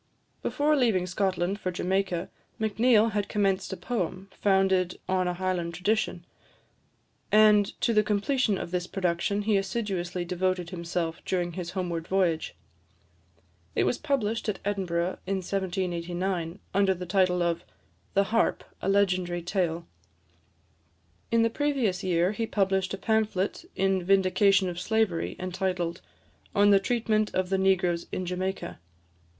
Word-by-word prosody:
Before 300 +1 +1
leaving 225 -10 +2
Scotland 185 +1 -1
for 185 - -2
Jamaica, 185 -1 -1 0.3
Macneill 220 +1 +3
had 205 -1 -1
commenced 195 -2 0
a 190 - -4
poem, 190 -1 -3
founded 190 -2 +2
on 185 -1 +1
a 180 - -1
Highland 175 -2 -2
tradition; 180 -1 -1 1.1
and 210 -1 +5
to 235 - +2
the 215 - +5
completion 210 +1 +1
of 170 - -5
this 180 -1 -1
production 190 +2 -1
he 210 -1 +3
assiduously 190 -3 -2
devoted 180 0 -1
himself 170 -2 -3
during 175 -2 -1
his 170 0 -5
homeward 170 -3 -2
voyage. 180 -4 0 1.2
It - - +3
was - - 0
published 230 -7 -1
at 205 - -1
Edinburgh 185 -3 -1
in 195 - 0
1789, 180 -2 -2 0.2
under 195 0 +3
the 180 0 -6
title 180 -1 +2
of 170 -1 -1 0.5
"The 200 - +5
Harp, 225 +3 +1 0.2
a 195 - -1
Legendary 185 -3 +1
Tale." 175 -2 -1 1.4
In 230 0 +3
the 230 - +3
previous 250 -10 0
year, 180 0 +2
he 225 +1 -2
published 195 -2 0
a - - -10
pamphlet 215 - 0
in 195 -1 +1
vindication 195 +1 +4
of 175 -1 -4
slavery, 215 -3 0
entitled, 185 -2 -2 0.5
"On 205 0 +5
the 200 - +6
Treatment 215 0 0
of 185 -1 0
the 190 0 +1
Negroes 180 -3 +2
in 185 - -3
Jamaica." 185 - -3
190 Hz, 135 wpm, -27 LUFS, 180-205 Hz, 1.4 s, the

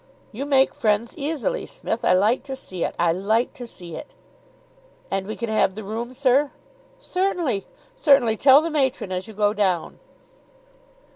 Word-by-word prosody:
"You 270 +6 -5
make 270 -2 +3
friends 215 +2 0
easily, 320 - -2
Smith. 230 - -4
I - - +4
like 210 +7 +3
to 270 -1 -5
see 185 -9 -6
it - - -2
I 170 -1 +3
like 215 +7 0
to 250 -5 -9
see 175 -6 -10
it." - - -10 1.0
"And 195 0 -2
we 215 - -4
can 235 - -4
have 215 -3 +1
the 215 - -6
room, 225 +4 -5
sir?" 275 +2 +3 0.5
"Certainly 355 - -1 0.3
certainly! 275 - +4
Tell 275 +5 +6
the 330 - -2
matron 265 -9 0
as 185 +3 -3
you 220 - -11
go 205 0 +2
down." 190 -5 -1
235 Hz, 165 wpm, -23 LUFS, 205-280 Hz, 1.0 s, Tell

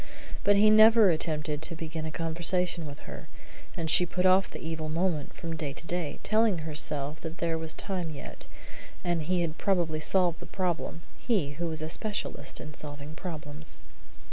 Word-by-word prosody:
But 205 - +5
he 215 +1 +6
never 215 -2 +8
attempted 155 -2 -2
to 165 - 0
begin 160 0 -4
a - - -4
conversation 170 +1 0
with 140 -1 -9
her, - - -9 0.5
and 165 - -2
she 175 +2 +5
put 180 +2 -1
off 185 +1 +5
the - - -7
evil 160 -1 -4
moment 165 -2 0
from 165 -2 -5
day 150 -3 -3
to 155 - -6
day, 170 -3 -2
telling 215 -3 +3
herself 150 -1 -2
that 165 +1 -6
there 170 -1 0
was 160 -1 -3
time 185 -4 -2
yet, 150 - -8 0.6
and 175 -2 0
he 175 +3 +1
had 160 -2 -2
probably 175 -5 +1
solved 175 +1 +2
the - - -9
problem 175 -3 -2 0.2
he, 195 - +1
who 170 +4 -3
was 160 -1 -3
a - - -2
specialist 210 +5 -2
in 150 - -8
solving 145 0 -6
problems. 155 -3 -7
165 Hz, 180 wpm, -29 LUFS, 155-180 Hz, 0.6 s, never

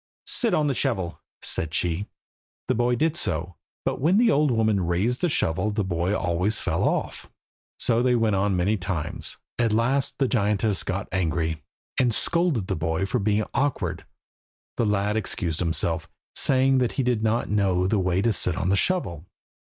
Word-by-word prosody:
"Sit 235 -3 +1
on 155 - +2
the 140 - +1
shovel," 90 -8 -1 0.2
said 80 +1 -3
she. 90 +3 0 0.6
The - - +2
boy 120 +1 +1
did 160 +6 +1
so, 90 - -1 0.3
but - - -1
when 170 +7 +3
the 230 0 +4
old 150 -2 +3
woman 110 -5 +1
raised 100 +9 0
the 175 - +2
shovel 90 - 0
the 105 0 -1
boy 90 +2 -1
always 90 +6 +1
fell - - -1
off. - - -3 0.5
So 115 +1 +2
they 125 0 +3
went 110 -3 +2
on 100 0 +1
many 100 +5 +1
times. 90 -4 -4 0.2
At 115 -2 +2
last 125 +5 +1
the 135 - +2
giantess 105 -3 +1
got 100 +2 -3
angry, 80 -3 -1 0.4
and 120 -4 +2
scolded 170 - +1
the - - -2
boy 80 +4 -1
for 125 +5 -1
being 105 +1 +1
so - - -10
awkward; 145 0 -1 0.7
the 115 - 0
lad 105 +1 +1
excused 85 -6 -2
himself, 80 -1 -1 0.3
saying 135 0 +3
that 125 -2 0
he 135 - 0
did 120 -3 0
not 110 +2 0
know 95 -3 +2
the 100 +2 +1
way 90 +1 +1
to 115 -1 +2
sit 90 0 +1
on 95 -2 -1
the 100 - +3
shovel. 95 - 0
105 Hz, 185 wpm, -25 LUFS, 90-125 Hz, 0.7 s, the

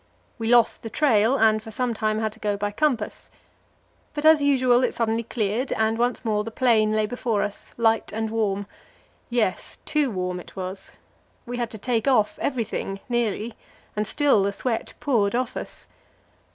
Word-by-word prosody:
We 225 - -2
lost 235 -1 +4
the 225 - -6
trail, 235 -1 +3
and 215 -2 +4
for 220 - -10
some 240 +2 -1
time 215 0 0
had 220 0 -1
to 220 - -18
go 205 -2 -1
by 205 0 -2
compass. 245 -3 -1 0.9
But 295 0 -3
as 315 -1 +7
usual 255 -3 +4
it - - 0
suddenly 225 0 0
cleared, 230 +2 -2
and 220 0 +1
once 245 0 0
more 210 -1 +1
the 225 - -5
plain 220 -3 +3
lay 215 0 +2
before 230 -1 -1
us, 205 -1 -7
light 225 -1 +2
and 220 0 -2
warm. 205 -3 0 0.6
Yes, 235 -6 -1
too 300 -3 +1
warm 180 -3 -3
it - - -13
was. 190 0 -6 0.5
We 245 0 -5
had 240 -2 -2
to 220 - -8
take 230 +1 -1
off 215 -6 +2
everything 225 -6 -2
nearly 235 -1 -1 0.4
and 210 0 -1
still 285 -6 +3
the 200 +1 0
sweat 230 +1 -3
poured 225 -7 +1
off 250 0 -1
us. - - -7
225 Hz, 180 wpm, -24 LUFS, 210-245 Hz, 0.9 s, as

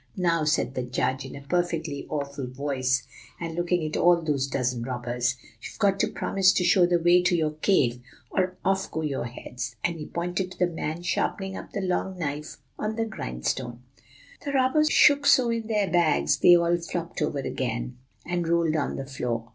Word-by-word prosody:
"'Now,' 165 -3 +1
said 150 -3 +1
the 130 - -2
judge, 130 +2 -1
in - - -9
a 140 - -8
perfectly 165 -3 -1
awful 140 -3 -4
voice, 130 -1 -1 0.4
and 165 -1 -4
looking 175 0 0
at 155 - -3
all 175 0 +5
those 145 -4 -1
dozen 125 -3 -1
robbers, 125 0 -2 0.3
'you've - - -9
got 195 -1 +2
to - - +3
promise 190 -1 +2
to 180 - +1
show 180 0 +5
the 175 0 +3
way 175 +1 +5
to 180 0 +2
your 155 -2 +1
cave, 125 -11 +2 0.3
or 185 -1 0
off 195 +1 +1
go 160 - -3
your 140 -5 -2
heads!' 125 0 -6
and 170 -2 -1
he 150 - -6
pointed 180 +2 -2
to - - -11
the 180 - +3
man 165 -1 -4
sharpening 190 +2 -1
up - - -9
the 200 - -2
long 185 0 -1
knife 150 -2 -4 0.2
on 215 +1 -2
the 225 0 0
grindstone. 120 - -4 0.6
"The 285 -2 -3
robbers 275 +4 +3
shook 285 -1 +5
so 245 -3 +5
in 230 -1 -2
their 210 -3 +1
bags 75 - +3
they 175 - +8
all 170 0 +3
flopped 170 -1 -5
over 150 -1 0
again, 125 -2 -3 0.3
and 175 -1 -2
rolled 165 -1 +2
on 150 - -1
the 135 - -5
floor. 120 -4 -4
165 Hz, 195 wpm, -26 LUFS, 130-180 Hz, 0.6 s, they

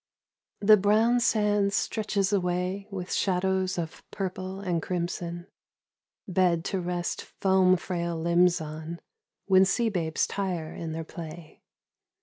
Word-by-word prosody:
THE 215 +1 +7
brown 220 +5 +3
sand 210 -3 +2
stretches 205 -1 0
away 185 +1 -1
with 190 -2 -5
shadows 190 0 +1
of 165 -2 -5
purple 190 -1 -4
and 180 -4 -1
crimson 175 0 -3 0.8
Bed 180 -3 +2
to 190 - -1
rest 175 0 -2
foam 190 -1 +3
frail 170 -1 -3
limbs 170 +2 +3
on, 160 +2 -6 0.5
when 190 -1 +6
sea 225 +4 +2
babes 165 -6 0
tire 180 -5 -3
in 165 -1 -5
their 165 0 -4
play. 160 -1 -10
185 Hz, 125 wpm, -27 LUFS, 170-195 Hz, 0.8 s, THE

